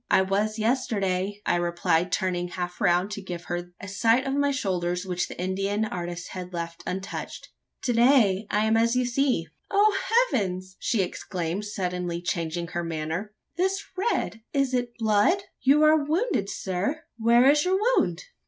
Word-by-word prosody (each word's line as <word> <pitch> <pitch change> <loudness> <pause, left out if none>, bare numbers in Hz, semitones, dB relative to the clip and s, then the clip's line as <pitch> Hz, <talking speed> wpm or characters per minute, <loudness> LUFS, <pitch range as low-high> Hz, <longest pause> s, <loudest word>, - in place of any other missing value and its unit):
"I 190 - +5
was, 205 +3 0
yesterday," 205 -4 0
I - - +2
replied, 175 0 +1
turning 180 -2 0
half 180 0 -5
round, 175 +3 +2
to 210 -1 -5
give 175 -2 -6
her 175 0 -4
a 200 - -8
sight 225 +6 +2
of 270 - -1
my 285 0 +2
shoulders, 180 -8 -1
which 180 -1 -1
the - - -10
Indian 195 +3 -1
artist 175 -3 -5
had 180 -1 -7
left 170 -1 -5
untouched. 190 +1 -5 0.3
"To 245 - +1
day, 230 -5 +4
I 210 +1 +2
am 220 0 +3
as 230 +2 +3
you 250 0 +2
see." 245 -7 +1 0.2
"O 410 +1 +4 0.4
heavens!" 185 -3 -2
she 215 -5 +1
exclaimed, 180 +1 -4
suddenly 180 -4 -3
changing 170 -1 -3
her 175 -1 -3
manner, 165 +6 -4 0.2
"this 385 +2 0
red? 370 - -1
It 275 -2 +1
is - - +3 0.2
blood! 225 - +3 0.2
You 280 +4 +5
are 305 -1 +5
wounded, 315 - 0
sir? 200 - -2 0.2
Where 235 +3 +5
is 295 +1 +5
your 370 +1 +2 0.2
wound?" - - +1
200 Hz, 165 wpm, -26 LUFS, 180-245 Hz, 0.4 s, I